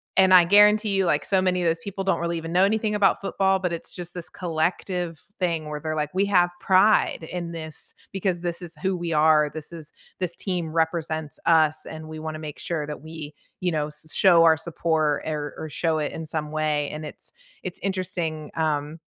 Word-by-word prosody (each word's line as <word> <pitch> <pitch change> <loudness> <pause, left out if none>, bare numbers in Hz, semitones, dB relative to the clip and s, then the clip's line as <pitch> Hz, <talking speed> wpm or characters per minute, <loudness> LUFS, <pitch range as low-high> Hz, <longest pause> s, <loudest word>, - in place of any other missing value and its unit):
and 190 0 +5
I 180 - +9
guarantee 210 +3 +6
you, 195 -1 +2
like, 150 -3 +1
so 190 -2 +2
many 180 -1 +1
of - - +2
those 165 0 +1
people 195 -1 -4
don't 195 - +1
really 170 0 -1
even 165 0 -5
know 180 +1 +5
anything 215 +1 0
about 205 -1 +3
football, 195 -1 +1
but 180 -2 -2
it's 170 - -7
just 175 -1 -7
this 175 -2 -7
collective 175 0 -2 0.2
thing 165 -4 -1
where 150 0 -4
they're 155 0 -3
like, 150 -1 -2
"We 190 +2 +2
have 180 -3 +3
pride 190 -2 +4
in 175 -2 -4
this 160 -2 -8 0.2
because 185 -2 -1
this 175 -1 -3
is 170 -1 -7
who 190 -1 +1
we 175 -1 -3
are. 155 -1 +4
This 155 +1 -8
is 160 -2 -9 0.3
this 180 -2 -2
team 175 -5 -3
represents 160 -1 -1
us, 155 -2 +3
and 155 0 -8
we 155 - -7
wanna 155 0 -5
make 150 -2 -7
sure 160 -4 -3
that 150 -1 -6
we, 155 -1 -8 0.3
you 180 -1 +1
know, 150 -2 -1
s 150 +1 -9
show 175 -4 +6
our 165 -1 +6
support, 160 -2 0
er, 150 -2 -3
or 160 - -5
show 160 +1 0
it 150 -1 -1
in 160 -1 -6
some 150 -1 -3
way," 155 -2 0
and 155 +1 -6
it's - - -12 0.3
it's 185 - -6
interesting, 180 -5 -3
um, 155 0 -1
165 Hz, 215 wpm, -25 LUFS, 155-185 Hz, 0.3 s, I